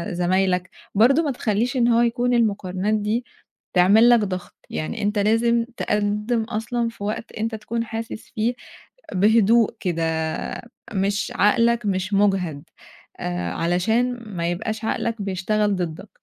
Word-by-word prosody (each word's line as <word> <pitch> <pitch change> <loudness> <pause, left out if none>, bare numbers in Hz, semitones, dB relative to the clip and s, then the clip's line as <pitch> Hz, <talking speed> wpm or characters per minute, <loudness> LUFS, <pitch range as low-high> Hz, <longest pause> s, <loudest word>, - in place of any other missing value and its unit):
زمايلك، 180 +1 +1 0.3
برضه 270 +10 +5
ما 290 - 0
تخلّيش 240 +1 -1
إن 240 -1 +3
هو 235 0 +4
يكون 245 +1 +1
المقارنات 200 -3 0
دي 215 +3 0 0.5
تعمل 200 +6 +6
لَك 240 - +6
ضغط 185 -4 -4
يعني 155 - -4
أنت 205 0 0
لازم 230 +3 +2
تقدِّم 210 +3 0
أصلًا 230 +2 -2
في 230 -3 -10
وقت 215 +2 -4
أنت 225 +1 -3
تكون 230 +2 -3
حاسس 225 0 -6
فيه 225 +3 +1 0.6
بهدوء 220 +3 +4
كده، 170 -3 -1 0.9
مش 200 +1 -1
عقلَك 235 +2 +3
مش 190 0 -1
مُجهد 190 -7 +1 0.6
آآ، 90 -1 -3
علشان 220 - +1
ما 175 -5 -2
يبقاش 215 +5 -4
عقلَك 230 -1 -2
بيشتغل 200 +2 0
ضدَّك، 180 +2 -5
210 Hz, 135 wpm, -23 LUFS, 190-230 Hz, 0.9 s, تعمل